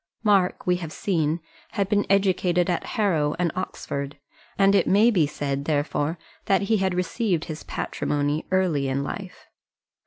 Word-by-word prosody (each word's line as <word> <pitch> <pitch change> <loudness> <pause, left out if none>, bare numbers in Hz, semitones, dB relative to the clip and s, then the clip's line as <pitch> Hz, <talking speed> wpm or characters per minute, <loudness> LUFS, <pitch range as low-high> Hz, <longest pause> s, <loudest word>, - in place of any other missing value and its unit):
Mark, 200 -4 +2
we 180 0 +2
have 165 -3 -6
seen, 165 -4 0 0.3
had 200 -2 0
been 205 0 +1
educated 185 -3 +2
at 175 - -1
Harrow 160 -9 +2
and 175 -1 +1
Oxford, 140 -5 -4 0.4
and 195 0 +5
it 200 - +3
may 215 +5 +5
be 170 -9 +3
said, 140 -1 -3
therefore, 150 +1 0 0.3
that 195 0 +2
he 220 +2 +2
had 190 -2 0
received 180 -1 0
his 155 -1 -6
patrimony 145 +1 -2
early 180 -7 +1
in 135 +1 -1
life. 185 +5 -7
180 Hz, 155 wpm, -25 LUFS, 150-195 Hz, 0.4 s, and